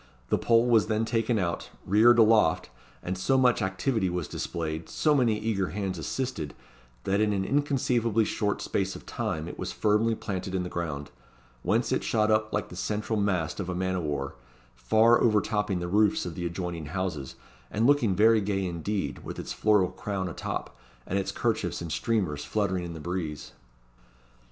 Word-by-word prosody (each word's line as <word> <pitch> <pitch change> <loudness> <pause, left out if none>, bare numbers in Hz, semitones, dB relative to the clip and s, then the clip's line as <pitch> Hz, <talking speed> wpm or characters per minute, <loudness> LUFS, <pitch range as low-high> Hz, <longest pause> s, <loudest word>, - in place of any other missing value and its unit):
The - - +2
pole 115 0 +4
was 115 -3 +4
then 110 0 +1
taken 115 0 0
out, 85 -4 -2 0.2
reared 115 +5 +6
aloft, 110 - +4 0.3
and 90 - -2
so 130 +9 +1
much 125 -2 +3
activity 95 +2 0
was 90 -3 -3
displayed, 80 -1 -4
so 150 - +2
many 120 -6 +3
eager 105 -4 -1
hands 95 -3 -3
assisted, 100 - -3 0.5
that 100 +2 +1
in 105 -1 +2
an 95 -1 -1
inconceivably 125 -5 +1
short 105 -1 -1
space 95 -1 -1
of - - -10
time 80 +1 -3
it - - -8
was - - -3
firmly 110 +2 +2
planted 95 -3 -4
in 90 - 0
the 90 - -5
ground; 75 -5 -4 0.5
whence - - +1
it - - +1
shot 110 -1 +2
up 110 0 +2
like 105 - -2
the - - -9
central 105 +3 -2
mast 90 -5 0
of 95 -3 -3
a 90 - -2
man 95 +1 -1
of 90 - -1
war, 70 -3 -3 0.4
far 110 - +4
overtopping 105 -3 +2
the 85 - -3
roofs 105 +3 +2
of 90 - -4
the 85 +1 -3
adjoining 85 -2 -4
houses, 80 -6 -3 0.3
and 110 +2 0
looking 125 -8 +3
very 110 +2 +5
gay 95 -1 -1
indeed, 90 +4 -3
with - - -7
its - - -5
floral 105 -4 +3
crown 95 -2 -3
a 85 - -5
top, - - -5 0.3
and 95 - -1
its 95 - -2
kerchiefs - - -1
and 85 -2 -6
streamers 90 -12 -1
fluttering 95 -4 -1
in 85 - -6
the 80 - -8
breeze. 80 -3 -4
100 Hz, 185 wpm, -28 LUFS, 85-110 Hz, 0.5 s, reared